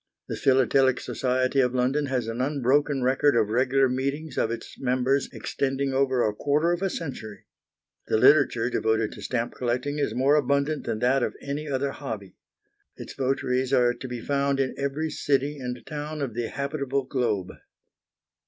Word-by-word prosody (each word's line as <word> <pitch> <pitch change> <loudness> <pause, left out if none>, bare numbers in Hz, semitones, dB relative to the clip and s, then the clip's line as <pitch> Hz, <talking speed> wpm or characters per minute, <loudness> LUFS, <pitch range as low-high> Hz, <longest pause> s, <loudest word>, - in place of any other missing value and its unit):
The - - -3
Philatelic 130 0 +3
Society 130 +1 0
of 125 -1 +2
London 135 +4 +1
has 130 -3 -1
an 115 +2 -3
unbroken 140 0 +1
record 135 +2 +3
of 110 -3 +2
regular 130 +3 +3
meetings 140 +3 -3
of - - +1
its 115 - -7
members 130 +1 +1
extending 135 0 -2
over 130 -2 +2
a 105 - -1
quarter 150 +9 +1
of 175 +1 -1
a 195 - +1
century. 130 - -6 0.6
The - - +2
literature 125 -2 +4
devoted 110 -1 +1
to - - -10
stamp 120 -2 -2
collecting 125 +4 -2
is - - -1
more 135 +3 +3
abundant 140 +1 +1
than - - -1
that 130 +2 +3
of - - -1
any 145 +2 -4
other 140 0 -1
hobby. 110 -10 -7 0.6
Its - - -8
votaries 130 -1 0
are 120 -2 +4
to 130 - -8
be 120 -2 -5
found 140 0 0
in 130 -1 0
every 140 +3 -2
city 145 0 0
and 125 -1 -4
town 150 0 -5
of 125 -5 -4
the 120 0 -2
habitable 140 -1 -2
globe. 110 -9 -1
135 Hz, 170 wpm, -26 LUFS, 125-140 Hz, 0.6 s, literature